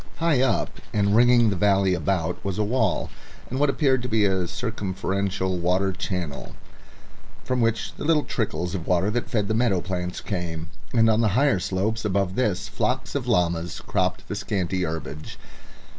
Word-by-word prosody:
High 165 -6 +2
up 135 - 0
and 100 0 +2
ringing 120 -1 +5
the - - -1
valley 95 0 +3
about 90 -1 -1
was 100 -1 -3
a 105 - +2
wall, 110 -2 0 0.4
and 130 - -2
what 145 0 +3
appeared 135 -3 +2
to 125 - -4
be 110 -2 +3
a 95 -2 +1
circumferential 95 -3 -2
water 90 +3 +1
channel, 90 -6 -4 0.9
from 125 -1 0
which 115 0 0
the - - -8
little 150 -1 +3
trickles 90 -6 -2
of 90 -4 -4
water 90 +3 +2
that 120 +2 -2
fed 105 -3 0
the 110 - 0
meadow 110 -5 +2
plants 90 0 -3
came, 85 -4 -4 0.2
and 115 -2 +4
on 110 0 +3
the 110 - +3
higher 135 -8 +3
slopes 95 +5 -1
above 100 -3 0
this 105 -5 0
flocks - - -1
of - - -2
llamas 85 -1 +1
cropped - - -1
the - - -4
scanty 95 -3 -1
herbage. 80 -2 -5
100 Hz, 175 wpm, -24 LUFS, 90-115 Hz, 0.9 s, ringing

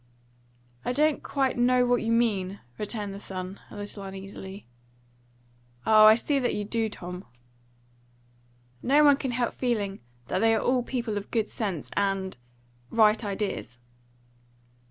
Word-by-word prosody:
"I 245 - -1
don't 300 +2 +2
quite 270 -3 0
know 250 +1 +4
what 245 0 +2
you 225 - -1
mean," 205 -5 +1 0.2
returned 210 -1 -3
the 200 - -7
son, 185 -1 -6
a - - -11
little 205 0 -5
uneasily. 195 0 -8 1.2
"Ah, 215 -1 +7
I 215 - +9
see 275 +4 0
that 250 - 0
you 210 - -2
do, 225 +1 -1
Tom." 180 -2 -7 1.6
"No 290 +4 +4
one 285 -2 +6
can 265 - -3
help 240 -1 -1
feeling 210 -6 -1 0.3
that - - 0
they 225 0 +4
are - - +1
all 250 +2 +2
people 235 -4 -2
of 200 - -12
good 220 -3 -1
sense 195 -9 -3
and 195 -1 0 0.5
right 220 0 +4
ideas." 200 - -3
215 Hz, 145 wpm, -27 LUFS, 195-245 Hz, 1.6 s, I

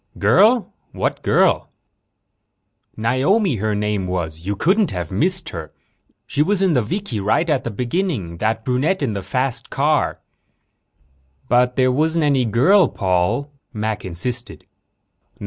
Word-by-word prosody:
"Girl? 205 - +3 0.2
What - - -2
girl?" - - +2 1.3
"Naomi, 135 - +1
her 105 +1 -1
name 105 -2 -1
was," 90 -3 -2
Paul - - -12
said. 85 - -13
"You 100 - -1
couldn't 160 - 0
miss 180 - +1
her. 80 -3 -7 0.5
She 140 - -1
was 195 +4 +1
in 185 -3 +3
the 125 - +3
vikie 120 - -3
right 110 - +1
at 150 -5 +1
the - - -3
beginning 120 - -2
that 110 +1 -1
brunette 140 +8 0
in 120 -6 -1
the 100 - -3
fast 125 +7 -2
car." 145 +1 0 1.3
"But 125 0 +2
there 130 -1 +3
wasn't 160 +4 +1
any 135 -4 +2
girl, 160 - +4
Paul," 95 +9 0 0.2
Mac 110 -1 -3
insisted. 120 +8 -5
125 Hz, 140 wpm, -20 LUFS, 105-160 Hz, 1.3 s, girl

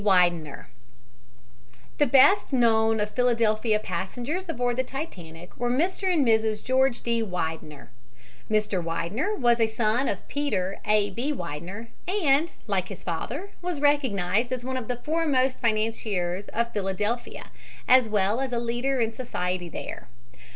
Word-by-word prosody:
WIDENER 175 -6 +2 1.3
The 290 - +4
best 275 +11 +5
known 225 -3 +3
of 210 0 -1
Philadelphia 225 -3 +2
passengers 245 - -4
aboard 245 -5 -1
the 260 - +2
Titanic 180 - -8
were 245 0 -1
Mr. 365 +8 +1
and 310 -6 +3
Mrs. 220 -2 +2
George 260 -1 +2
D. 235 -1 0
Widener. 160 -7 -4 0.6
Mr. 210 -4 +1
Widener 175 - -2
was 240 - +3
a 225 - +4
son 220 +3 0
of - - -3
Peter 200 -10 -1
A. 210 -1 +3
B. 245 +9 -2
Widener 180 - -6 0.2
and, 330 -5 +2 0.2
like 190 -4 -1
his 195 -3 -9
father, 265 - -4
was 350 -4 -3
recognized 245 -7 +1
as 250 -1 -3
one 260 0 -3
of 250 -4 -4
the 250 - -1
foremost 270 -2 0
financiers 215 -5 -1
of 235 +1 -2
Philadelphia 205 +4 -3 0.4
as 255 -3 +6
well 210 +3 +1
as 265 -1 -2
a 240 - -1
leader 240 +3 -1
in 225 -1 +1
society 180 -8 -3
there. - - -7
230 Hz, 145 wpm, -26 LUFS, 200-260 Hz, 1.3 s, as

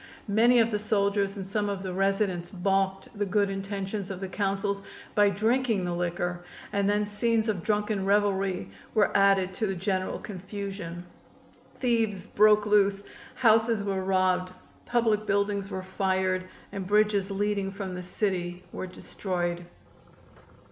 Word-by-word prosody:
Many 235 +3 +5
of 230 0 +3
the 210 - 0
soldiers 200 -1 +1
and 195 - -4
some 205 +1 -1
of 195 -1 -3
the 185 -1 -4
residents 195 -2 0
balked 195 +2 -1
the 205 - -1
good 200 0 +1
intentions 195 0 -4
of 190 -2 -5
the 190 - -4
Councils 200 +1 -1 0.3
by 205 -1 +5
drinking 220 0 +1
the 175 - -1
liquor, 175 0 -2 0.3
and 200 0 +2
then 210 0 +2
scenes 220 +2 0
of 205 -5 -1
drunken 210 0 0
revelry 195 - +1 0.2
were 210 -2 +3
added 195 -1 +4
to 215 +3 -1
the 195 - -2
general 185 +1 -1
confusion. 195 -3 -6 0.7
Thieves 225 -6 0
broke 210 0 +4
loose, 200 -1 +3 0.3
houses 225 -2 +3
were 195 -2 -1
robbed, 185 -1 +1 0.4
public 225 -3 +1
buildings 200 0 0
were 190 -2 -4
fired 185 -1 0 0.3
and 195 -2 -5
bridges 210 -1 +3
leading 200 0 0
from 195 -1 -5
the 180 - -5
city 180 -1 -2
were 185 - -5
destroyed. 175 -2 -3
195 Hz, 145 wpm, -28 LUFS, 185-210 Hz, 0.7 s, Many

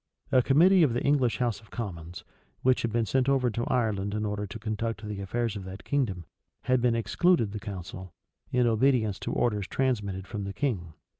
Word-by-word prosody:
A 130 -2 +6
committee 175 +9 +5
of 145 -8 +4
the 120 - -1
English 130 -7 +2
house 115 -4 -1
of 105 - -20
commons, 85 -7 -6 0.4
which 130 0 +3
had 115 - -1
been 115 0 +1
sent 130 +4 +1
over 130 -3 +2
to 115 +3 -2
Ireland 105 -4 0
in 105 0 -1
order 105 0 -2
to 100 - -7
conduct 110 0 -3
the 105 -2 -5
affairs 115 +3 -2
of 100 - -5
that 95 0 -8
kingdom, 105 - -1 0.4
had 130 -1 +2
been 120 -1 +3
excluded 115 - +2
the 105 - -5
council, 95 -2 -7 0.4
in 125 -1 +3
obedience 115 -3 +2
to - - -4
orders 105 -5 0
transmitted 105 -8 -1
from 105 0 -5
the 100 - -5
king. 95 - -2
110 Hz, 200 wpm, -28 LUFS, 100-125 Hz, 0.4 s, A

